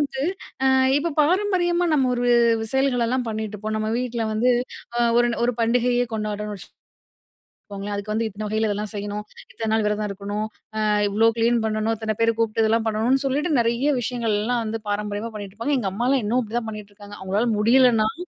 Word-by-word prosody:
வந்து 275 -2 -2 0.4
அ - - +4 0.3
இப்ப 330 +1 -2
பாரம்பரியமா 355 0 +2
நம்ம 265 -3 +2
ஒரு 245 0 0 0.5
செயல்கள் 265 -3 +2
எல்லாம் 250 -1 -1
பண்ணிட்டிருப்போம். 215 0 -4
நம்ம 215 0 -1
வீட்ல 235 -2 -2
வந்து 245 +4 +3 0.5
அ - - +1 0.2
ஒரு 240 0 +3 0.2
ஒரு 245 -1 +1
பண்டிகையே 245 +1 +2
கொண்டாட்றன்னு 210 -1 -3
வச்சு - - -12 1.0
கோங்களேன். 200 +1 -5
அதுக்கு 205 +1 -5
வந்து 225 +1 0
இத்தன 215 +1 -6
வகையில 220 +1 0
இதெல்லாம் 210 +1 -3
செய்யணும், 205 +1 -4 0.3
இத்தன 225 -1 -4
நாள் 220 -1 +2
விரதம் 210 0 0
இருக்கணும், 205 +2 -4 0.4
அ - - +1 0.2
இவ்ளோ 220 +3 +3
கிளீன் 235 +1 +3
பண்ணணும், 215 +1 0
இத்தன 220 -1 -3
பேர 230 0 +3
கூப்ட்டு 225 -1 0
இதெல்லாம் 225 +1 +2
பண்ணணும்னு 235 +6 +1
சொல்லிட்டு, 290 +5 0
நிறைய 235 +5 +1
விஷயங்கள்லாம் 230 0 -1
வந்து 225 0 -3
பாரம்பரியமா 205 +2 -3
பண்ணிகிட்டுருப்பாங்க. 215 +7 -3
எங்க 195 -4 -1
அம்மாலாம் 245 +5 +1
இன்னும் 235 +5 +1
அப்பிடிதான் 230 0 -3
பண்ணிகிட்டுருக்காங்க. 205 -1 -10
அவுங்களால 200 +5 0
முடியலன்னாலும், 240 +7 +3
225 Hz, 165 wpm, -23 LUFS, 210-245 Hz, 1.0 s, அ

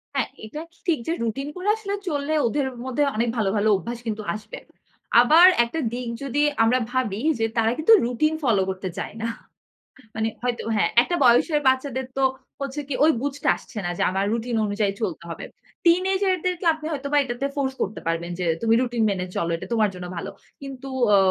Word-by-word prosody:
হ্যাঁ। 265 -4 0 0.2
এটা 295 +8 -7 0.2
ঠিক 335 -4 +2
যে 330 - +1
রুটিন 250 +5 -2
করে 365 +2 -5
আসলে 420 -2 -5
চললে 290 -1 -1
ওদের 275 +4 0 0.2
মধ্যে 260 +3 0
অনেক 230 +2 +1
ভালো, 210 -3 +1
ভালো 210 +1 +2
অভ্যাস 235 +5 -5
কিন্তু 215 -1 -2
আসবে। 215 0 -8 0.6
আবার 315 +8 +7 0.2
একটা 280 +8 -4
দিক 245 -1 -4
যদি 275 +1 0 0.2
আমরা 245 +3 +3
ভাবি 230 -5 -1 0.2
যে 225 - +2
তারা 225 0 +3
কিন্তু 315 +9 +5
রুটিন 280 +6 +1
ফলো 225 -7 +3
করতে 190 0 -4
চায় - - -4
না। 230 - -1 0.9
মানে 220 0 0 0.2
হয়তো 245 -1 -1
হ্যাঁ, 210 - +2
একটা 350 +7 -1
বয়সের 260 +5 +4
বাচ্চাদের 260 0 +1
তো 270 - +2 0.4
হচ্ছে 275 +1 -4
কি - - -1
ঐ - - +7 0.2
বুঝতে 285 0 -3
আসছে 255 - -13
না - - -1
যে - - +1
আমার 195 +1 0
রুটিন 235 +1 -2
অনুযায়ী 205 -1 0
চলতে 180 -5 -3
হবে। 165 - -6 0.4
টিনেজের 375 +2 +3
দেরকে 360 0 -1
আপনি 310 -1 -9
হয়তো 285 -2 -3
বা - - +5
এটাতে 240 +1 -3
ফোর্স 270 -2 -1
করতে 205 - -2
পারবেন 165 +1 -1
যে 180 - -1 0.2
তুমি 225 0 +3
রুটিন 240 -2 0
মেনে 185 -2 -2
চল। 170 - 0
এটা 165 - -7
তোমার 215 -2 +3
জন্য 180 0 -7
ভালো। - - -4 0.3
কিন্তু 270 -1 -8 0.3
আ - - +7
250 Hz, 195 wpm, -24 LUFS, 220-290 Hz, 0.9 s, আবার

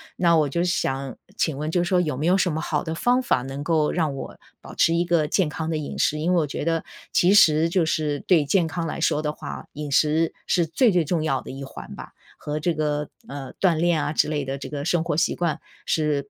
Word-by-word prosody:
那 170 -2 +3
我 150 -3 +2
就 170 +5 0
想 135 -7 -1 0.2
请 155 - 0
问 155 +1 -3
就 175 +1 +1
说 180 0 +2
有 150 -6 -2
没 150 - -2
有 180 +2 +4
什 180 -3 +1
么 155 - -2
好 155 -1 -1
的 160 0 -4
方 245 +7 +2
法， 130 - +1
能 135 +2 -6
够 155 -2 +1
让 155 -5 -1
我 - - -7 0.2
保 - - -11
持 165 - +3
一 175 +1 +1
个 165 -3 +2
健 180 0 +1
康 160 +2 -4
的 160 - -1
饮 150 - -5
食。 150 - +2
因 170 +4 0
为 - - +3
我 150 - -1
觉 145 - -4
得， 165 -1 0 0.3
其 180 +2 +4
实 160 -3 +5
就 175 -2 +2
是 150 -2 -1
对 170 -5 +3
健 170 +4 +2
康 165 0 -3
来 155 - -4
说 155 -2 +1
的 150 -1 -1
话， - - -8
饮 150 -1 -6
食 155 +3 +2
是 175 -2 +2
最 210 - +3
最 175 -3 +2
重 160 -1 0
要 135 -5 0
的 - - -9
一 135 +1 -7
环 135 - -9
吧。 - - -10 0.2
和 150 +1 -4
这 170 +2 0
个， 150 -1 -1 0.2
呃， 135 -2 -7
锻 180 -4 +3
炼 170 -2 +2
啊 150 - -2
之 - - +2
类 145 -3 -2
的 135 +1 -3
这 - - -7
个 145 0 -5
生 170 -2 +1
活 160 -3 -2
习 170 - +1
惯， 170 -3 -1 0.3
是 145 -3 0
155 Hz, 275 characters per minute, -24 LUFS, 150-170 Hz, 0.3 s, 实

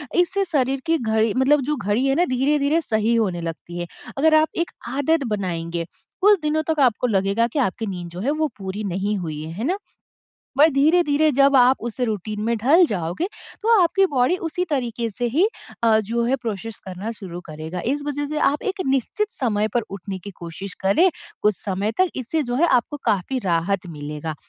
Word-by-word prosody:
इससे 360 +3 +2
शरीर 270 -2 +1
की 330 0 +2
घड़ी 220 -3 +1
मतलब 275 +2 +4
जो 300 +4 0
घड़ी 220 +1 0
है 270 - +3
ना 350 +4 +3
धीरे-धीरे 285 +3 +2
सही 220 -2 +1
होने 190 -7 0
लगती 170 +1 -6
है। 175 - -4 0.3
अगर 310 +3 +4
आप 310 0 +5 0.2
एक - - -12 0.2
आदत 285 +4 +1
बनाएँगे, 170 -5 -2 0.4
कुछ 410 0 +6
दिनों 305 +1 +1
तक 320 -2 0
आपको 250 -2 +3
लगेगा 200 +2 +2
कि 295 - 0
आपकी 225 -2 0
नींद 175 -3 -5
जो 175 +2 -8
है 265 +8 0
वो 310 0 0
पूरी 195 +2 -5
नहीं 195 +2 -1
हुई 155 -5 -4
है, 160 - -7
है 205 +7 -5
ना? 365 +6 0 0.8
बट 310 +3 +7
धीरे-धीरे 310 +1 +3
जब 275 +1 +4
आप 255 0 +6
उस 235 - -13
रूटीन 215 -2 -2
में 235 +1 +1
ढल 310 - +5
जाओगे 180 - -2 0.4
तो 455 -1 +5
आपकी 385 +3 +4
बॉडी 265 +8 +3
उसी 360 +3 -2
तरीके 235 -5 -1
से 245 +4 -3
ही 320 - +3 0.4
अ, 220 -1 +5
जो 230 +3 -1
है 260 +3 +2
प्रोसेस 225 -2 -5
करना 190 +4 -5
शुरू 180 -5 -8
करेगा। 160 +3 -6
इस 290 - -4
वजह 290 0 -2
से 305 - -3
आप 290 0 +2
एक 390 -1 -2
निश्चित 270 - 0
समय 215 -4 +1
पर 240 - +3
उठने 195 0 -6
की 200 +3 -9
कोशिश 175 +3 -7
करें, 320 - +4 0.3
कुछ 210 -1 +3
समय 200 +2 -1
तक 370 -2 +4
इससे 275 +5 -1
जो 245 -1 -3
है 335 +7 +3
आपको 260 +2 +1
काफ़ी 220 +4 0
राहत 180 +3 0
मिलेगा। 150 0 -5
235 Hz, 200 wpm, -22 LUFS, 195-295 Hz, 0.8 s, बट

